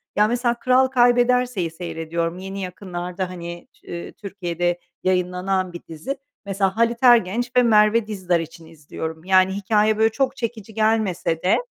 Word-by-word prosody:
ya, 210 +1 +4
mesela, 240 +1 +1
Kral 255 +1 +4
Kaybederse'yi 245 -6 +2
seyrediyorum. 165 0 -4
Yeni 195 +1 -6
yakınlarda, 180 0 -5
hani, 170 -1 -8
Tü-Türkiye'de 175 -1 -4 0.2
yayınlanan 185 0 0
bir 175 - -7
dizi. 165 - -5 0.3
Mesela 195 0 -1
Halit 230 +1 +1
Ergenç 240 0 +4
ve 250 - +6
Merve 215 -1 +4
Dizdar 185 -5 0
için 165 0 -8
izliyorum. 160 0 -7
Yani, 185 0 +4
hikâye 210 +2 +2
böyle 220 +1 +4
çok 270 +4 0
çekici 225 -2 -5
gelmese 215 -7 0
de, 185 - +4
190 Hz, 140 wpm, -22 LUFS, 175-225 Hz, 0.3 s, ve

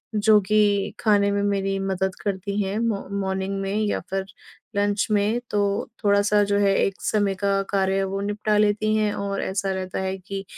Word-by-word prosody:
जो 210 0 +5
कि 205 0 +2
खाने 205 -2 +3
में 200 - 0
मेरी 195 -1 0
मदद 190 -1 -1
करती 200 0 -2
हैं 195 +1 -2
मॉ 225 -4 0 0.2
मॉर्निंग 190 0 -2
में 195 0 -2
या 205 - 0
फिर 195 0 -2 0.5
लंच 205 0 +1
में। 210 +3 +2
तो 205 -1 0
थोड़ा-सा 205 0 +3
जो 200 0 +1
है 200 -1 +3
एक 195 - -2
समय 205 -2 +1
का 195 +1 +1
कार्य 195 -1 +1
वो 195 +1 -3
निपटा 210 +1 0
लेती 215 +1 +2
हैं 215 -1 +1
और 200 0 -3
ऐसा 195 0 -1
रहता 185 -1 -3
है 190 0 -2
कि 195 +1 -6
200 Hz, 180 wpm, -24 LUFS, 195-205 Hz, 0.5 s, जो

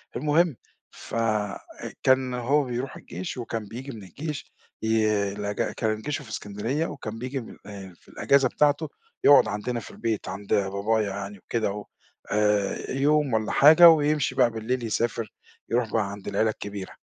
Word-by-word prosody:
المهم 150 +3 +2 0.4
ف - - -9 0.9
كان 130 -1 +3
هو 130 +5 +2
بيروح 125 +1 -4
الجيش 90 +8 -7
وكان 115 -2 -4
بييجي 130 +6 -7
من 110 -5 -9
الجيش 150 - -6 0.3
ي 110 -1 +2 0.3
الإج 105 0 -3
كان 110 -1 -1
جيشه 145 +1 -3
في 115 - -14
إسكندرية 110 +10 -3
وكان 110 -5 -7
بييجي 130 +3 -3
من 115 - -12
آآ 95 -3 -9
في - - -28
الإجازة 135 -2 +3
بتاعته 150 +3 +2 0.3
يقعد 140 -6 +7
عندنا 110 +4 -3
في - - -11
البيت 110 -4 -3
عند 100 +1 -4
بابايا 100 +2 +1
يعني 100 +1 -6
وكده 110 +2 -2
و 105 0 -6 0.5
آآ 105 -1 +1
يوم 145 0 +2
والّا 110 -1 0
حاجة 160 +4 +9
ويمشي 150 -3 +2
بقى 120 - +4
بالليل 120 +3 -2
يسافر، 115 0 -2 0.4
يروح 115 -1 0
بقى 105 -3 0
عند 100 -1 -9
العيلة 110 - +1
الكبيرة. 100 -2 -6
115 Hz, 160 wpm, -26 LUFS, 105-135 Hz, 0.9 s, حاجة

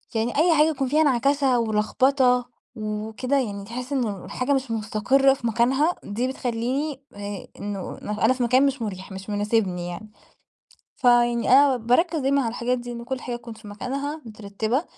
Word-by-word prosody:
يعني 225 +4 -1
أي 330 +1 +4
حاجة 305 +1 +5
يكون 275 -4 -1
فيها 305 +4 +3
نعكشة 275 -1 +2
ولخبطة 245 +3 +2 0.3
وكده، 220 +5 -2
يعني 205 -6 -3
تحس 250 +5 -6
إن 215 -9 -2
الحاجة 255 +8 -1
مش 265 -3 -1
مستقرة 225 +5 +2
في 240 -3 -4
مكانها، 260 +8 +2
دي 230 +5 -2
بتخلّيني 260 +3 -2
آآ، 205 -1 -6
إنه 200 -2 -5
أنا 210 +3 +1
في 255 -1 -2
مكان 255 +3 +4
مش 275 -3 -1
مريح، 190 -3 -5
مش 190 +2 -8
مناسبني 205 -4 0
يعني. 195 +5 -7 0.9
فيعني 240 -1 +3
أنا 270 0 +6
باركز 250 +9 +2
دايمًا 275 +1 +2
على 230 - -1
الحاجات 245 +1 -1
دي 240 0 -7
إن 235 0 -7
كل 260 0 -4
حاجة 245 -1 -4
تكون 235 -1 -10
في 220 -1 -13
مكانها، 280 +8 -4
مترتبة، 220 - -2
240 Hz, 170 wpm, -24 LUFS, 215-270 Hz, 0.9 s, أنا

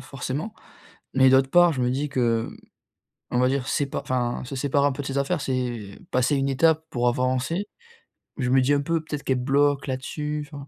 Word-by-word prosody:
forcément. 135 - -5 0.6
Mais 130 0 +6
d'autre 130 0 +4
part, 175 +1 +5
je 130 - -2
me 125 - +1
dis 145 +3 -2
que, 120 -4 +1
mmh, - - -9 0.8
on 125 - +1
va 125 - +4
dire 135 -1 -1
c'est 145 - 0
pas 140 - -4
enfin, 125 -1 -2
se 130 - -7
séparer 140 +1 +1
un 145 - +2
peu 145 - -5
de - - -8
ses 135 0 -2
affaires, 150 +4 0
c'est 120 -7 -3
passer 130 +3 +2
une 135 0 0
étape 160 +3 +2
pour 120 0 +1
avancer. 130 +9 0 0.7
Mais 130 - -2
je 125 - 0
me 130 0 +5
dis 135 +3 +2
un 140 - +2
peu: 165 +2 -1
«Peut-être 150 -2 -5
qu'elle 130 -1 0
bloque 140 +1 +2
là-dessus», 150 +3 -4
enfin 140 -2 -9
135 Hz, 220 wpm, -24 LUFS, 130-145 Hz, 0.8 s, Mais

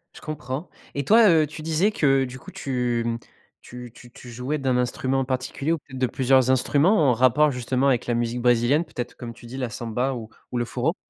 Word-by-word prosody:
Je - - -12
comprends 150 +1 -5 0.3
et 140 -1 -2
toi, 220 +3 +6
heu, 160 -3 +4
tu 155 +2 -9
disais 165 +6 +1
que, 135 -8 +2
du 130 0 -7
coup, - - -12
tu, 125 -3 -1
mmh, 115 0 -1 0.4
tu 125 -1 -10
tu 120 - -15
tu 120 0 -12
jouais 125 +6 -3
d'un 130 -3 0
instrument 130 +2 0
particulier 130 +3 -2
ou - - 0
peut-être 130 -3 -11
de 130 - +2
plusieurs 130 +1 +2
instruments, 145 - +3
en - - +4
rapport, 130 +5 +4
justement, 130 +1 0
avec 125 -4 +1
la 120 - +1
musique 120 +1 -1
brésilienne, 120 +6 +3
peut-être, 125 -6 -6
comme 120 -2 -8
tu 120 - -16
dis 120 +3 -8
la 125 -3 -2
samba 120 +4 -2
ou 115 -3 -7 0.2
ou 125 - -2
le 120 - 0
choro? 125 +8 -1
130 Hz, 220 wpm, -24 LUFS, 120-145 Hz, 0.4 s, toi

